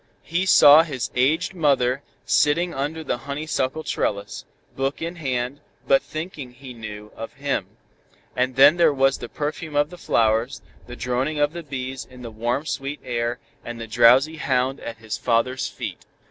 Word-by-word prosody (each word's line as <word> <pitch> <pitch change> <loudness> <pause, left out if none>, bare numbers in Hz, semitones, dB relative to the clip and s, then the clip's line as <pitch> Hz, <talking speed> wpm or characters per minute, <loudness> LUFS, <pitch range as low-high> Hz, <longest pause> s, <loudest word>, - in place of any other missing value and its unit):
He 175 +4 -1
saw 150 -3 +9
his 135 -8 -4
aged 160 +9 +1
mother 140 -6 +2 0.2
sitting 170 +4 +2
under 150 +4 -3
the 120 - -2
honeysuckle 150 0 -2
trellis, 100 -8 -3 0.3
book 135 +1 -2
in 170 +2 -5
hand, 130 -2 -2 0.3
but 135 - +5
thinking, 155 -6 -7
he 130 0 -11
knew, 105 -2 -9
of 115 - -7
him. - - -3 0.6
And 125 0 0
then 140 +5 +7
there 170 - +5
was 135 0 +2
the 120 - -7
perfume 150 +1 -4
of 145 +2 +2
the 180 - -11
flowers, 115 -1 +1 0.2
the 125 - -8
droning 125 +5 -1
of 145 +1 +1
the 170 - -5
bees 135 -3 -5
in 125 -1 -14
the 115 - -7
warm 120 +6 -2
sweet 140 -1 -4
air 120 -1 -2 0.3
and 120 0 -7
the 115 - -5
drowsy 120 +7 +5
hound 130 -1 0
at 115 -1 -7
his 110 -1 -5
father's 125 +2 +1
feet. - - -7
135 Hz, 170 wpm, -23 LUFS, 120-150 Hz, 0.6 s, saw